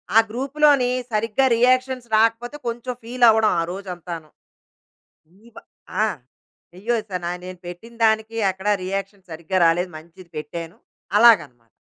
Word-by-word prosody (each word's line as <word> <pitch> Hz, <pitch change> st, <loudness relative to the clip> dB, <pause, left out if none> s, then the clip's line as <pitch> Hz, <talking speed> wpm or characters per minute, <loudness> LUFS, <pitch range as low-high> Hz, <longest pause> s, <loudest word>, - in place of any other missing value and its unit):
ఆ -, -, +9 dB
గ్రూప్‌లోని 275 Hz, +2 st, +2 dB, 0.2 s
సరిగ్గా 225 Hz, +4 st, +1 dB
రియాక్షన్స్ 255 Hz, 0 st, +2 dB
రాకపోతే 230 Hz, +4 st, +1 dB
కొంచెం 240 Hz, +2 st, -4 dB
ఫీల్ 245 Hz, +2 st, -3 dB
అవ్వడం 220 Hz, -1 st, +4 dB
ఆ -, -, +2 dB
రోజు 195 Hz, +1 st, -8 dB
అంతాను. 170 Hz, -2 st, -8 dB, 1.2 s
ఇప 235 Hz, -, -25 dB, 0.5 s
ఆ! -, -, +4 dB, 0.7 s
అయ్యో! 220 Hz, +6 st, -1 dB, 0.2 s
స -, -, -13 dB
న -, -, -2 dB, 0.2 s
నేను 185 Hz, 0 st, -8 dB
పెట్టిన 180 Hz, +7 st, -10 dB
దానికి 220 Hz, +1 st, +1 dB
ఎక్కడ 190 Hz, +2 st, -5 dB, 0.2 s
రియాక్షన్ 195 Hz, 0 st, -5 dB
సరిగ్గా 170 Hz, +4 st, -4 dB
రాలేదు 175 Hz, +2 st, +2 dB
మంచిది 170 Hz, +2 st, -14 dB
పెట్టాను 165 Hz, +3 st, -6 dB, 0.4 s
అలాగనమాట. 145 Hz, -, +4 dB
215 Hz, 130 wpm, -22 LUFS, 175-235 Hz, 1.2 s, ఆ